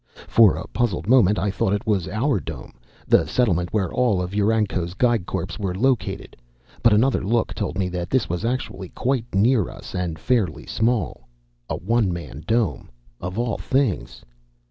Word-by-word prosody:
For 110 -4 +6
a - - -5
puzzled 100 -8 -1
moment 110 -5 +5
I 100 +4 0
thought 95 0 0
it 105 - -2
was 100 -6 0
our 110 +3 0
Dome, 75 -8 -8 0.3
the - - +4
settlement 90 -8 +1
where 100 -5 -1
all 120 -7 +2
of 90 0 -3
UranCo's 100 -4 0
Geig 120 -5 +1
Corps 95 0 -3
were 95 -3 -2
located, 125 +4 -1 0.5
but 115 - +5
another 115 +4 +3
look 115 +4 0
told - - -3
me 95 -2 0
that 90 0 -4
this 130 -1 +1
was 90 +3 -3
actually 110 -6 -3
quite 130 -2 -1
near 110 0 +3
us - - -10
and 90 -3 -2
fairly 115 +2 0
small. 110 - -1 0.4
A - - -1
one 110 +1 +1
man 85 -3 -7
Dome, 115 -1 0 0.3
of 90 +3 -5
all 120 -2 -1
things! 130 - -1
105 Hz, 170 wpm, -23 LUFS, 90-120 Hz, 0.5 s, For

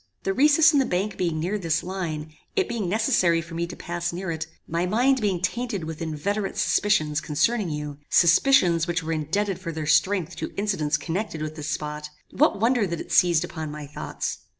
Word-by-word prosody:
The 195 - 0
recess 300 +6 +5
in 285 - +4
the 265 - +3
bank 195 +2 -1
being 170 -3 -1
near 190 +6 -1
this 165 -3 0
line, 160 -5 -4 0.2
it 390 - +2
being 220 -6 -2
necessary 205 -5 +2
for 165 +1 -8
me 170 +1 -2
to 175 - -8
pass 175 0 -3
near 175 0 -4
it, 160 0 -4 0.2
my 170 +2 -1
mind 250 +6 +2
being 195 -4 0
tainted 210 +1 -2
with 160 0 -6
inveterate 195 +6 -2
suspicions 155 -8 +2
concerning 175 +7 0
you; 150 -1 -5
suspicions 170 - +4
which 175 -1 -1
were 165 +1 -2
indebted 175 +6 -1
for 165 - -5
their 155 -1 -4
strength 180 +3 +2
to - - -5
incidents 175 -8 0
connected 165 +1 -3
with 155 0 -5
this 155 -1 -5
spot; 150 0 -4 0.2
what 300 -7 +2
wonder 230 -1 +2
that 170 -2 -4
it - - -8
seized 175 -2 +4
upon 160 -3 -6
my 150 0 -7
thoughts! 145 - -5
175 Hz, 195 wpm, -25 LUFS, 155-205 Hz, 0.2 s, recess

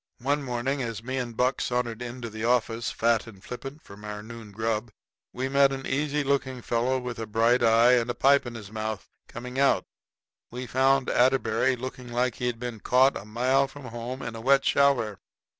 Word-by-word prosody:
One 145 +2 +1
morning, 130 +1 -2
as 115 -3 -4
me 130 +2 -3
and 120 -3 -4
Buck 125 +1 +1
sauntered 120 -2 -1
into 120 0 -6
the 110 0 -7
office, 120 -1 +1
fat 115 -1 +1
and 100 -4 -13
flippant, 135 +4 -8
from 100 +1 -13
our 105 0 -6
noon 115 -1 -10
grub, 110 +2 -2 0.4
we 130 +2 -3
met 140 0 +4
an 135 0 -5
easy 145 +2 0
looking 135 -3 -1
fellow, 120 +3 +1
with 125 -2 -5
a 115 - -4
bright 115 +3 +3
eye 115 +1 +5
and 120 -1 +3
a 120 - -1
pipe 140 +2 +4
in 120 - -7
his 105 -3 -9
mouth, 110 -2 -4 0.2
coming 125 +2 -6
out. 140 0 +3 0.7
We 125 +2 -6
found 135 +2 +2
Atterbury 130 0 +2
looking 125 0 -7
like 125 +1 0
he'd 125 -1 -2
been 120 -1 -5
caught 130 +5 +4
a - - -6
mile 130 +5 +2
from 145 +1 -12
home 120 +2 -6
in 115 -1 -5
a 115 - -7
wet 135 +3 +4
shower. 125 -9 +2
125 Hz, 195 wpm, -27 LUFS, 115-130 Hz, 0.7 s, eye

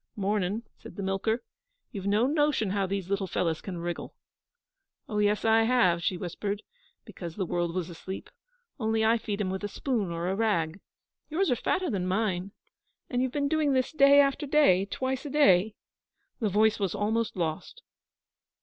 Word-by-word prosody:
'Mornin',' 205 +1 -1 0.2
said - - -12
the 200 - -5
milker. 205 +5 -1 0.5
'You've 195 -1 -5
no 210 +4 +3
notion 290 -8 +1
how 200 -1 0
these 195 -1 -3
little 195 0 -1
fellows 165 -2 -1
can 185 -3 -6
wriggle.' 170 0 -5 0.9
'Oh, 210 -5 -2
yes, 210 +1 +2
I 225 0 +5
have.' 225 -8 +3
She 180 +2 0
whispered, 200 +4 -4 0.4
because 170 -3 -8
the 190 - -2
world 175 0 -1
was 180 -3 -2
asleep. 185 +3 -8 0.5
'Only 220 -1 +1
I 225 +1 +4
feed 210 -2 -4
them 185 -2 -1
with 190 +2 -4
a - - 0
spoon 220 -3 -2
or 170 +1 -3
a 190 - 0
rag. 195 -6 0 0.5
Yours 330 0 +1
are - - +3
fatter 360 +6 -1
than 185 -4 -1
mine.... 190 -1 -1 0.6
And 250 -1 +1
you've 260 -1 0
been 285 0 0
doing 300 -1 +2
this 260 -1 +1
day 280 -2 +6
after 280 +1 +2
day, 265 -11 +4
twice 260 +5 -2
a 295 - -5
day?' 215 -8 +4 0.6
The 220 -4 0
voice 215 +3 +3
was 195 -4 -1
almost 220 +2 0
lost. 170 - -3
205 Hz, 175 wpm, -28 LUFS, 185-245 Hz, 0.9 s, day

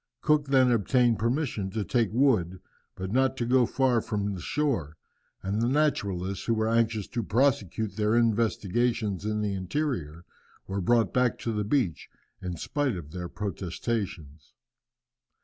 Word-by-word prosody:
Cook 150 -1 +2
then 130 -2 +4
obtained 120 +1 +2
permission 115 -4 -1
to 110 +2 -2
take 115 +3 +1
wood, 110 -8 +2 0.4
but 95 +1 -5
not 130 +2 +2
to 120 - -1
go 125 0 +4
far 130 -4 +2
from 105 -2 -2
the 90 - -6
shore, 95 - -1 0.5
and 100 +3 -1
the 120 - +2
naturalists, 100 -10 0
who 115 - +1
were 110 0 0
anxious 115 -2 +1
to 120 - -2
prosecute 110 - 0
their 105 +1 +2
investigations 115 -2 +1
in 105 0 -1
the 100 -1 -1
interior, 95 - -3 0.4
were 95 +1 -3
brought 115 -1 +2
back 125 -2 +2
to 115 - -2
the 105 -1 -1
beach, 105 - -1 0.3
in 90 -2 -4
spite 145 - -1
of 80 -4 -8
their 90 -1 -5
protestations. 90 - -4
110 Hz, 150 wpm, -27 LUFS, 95-125 Hz, 0.5 s, then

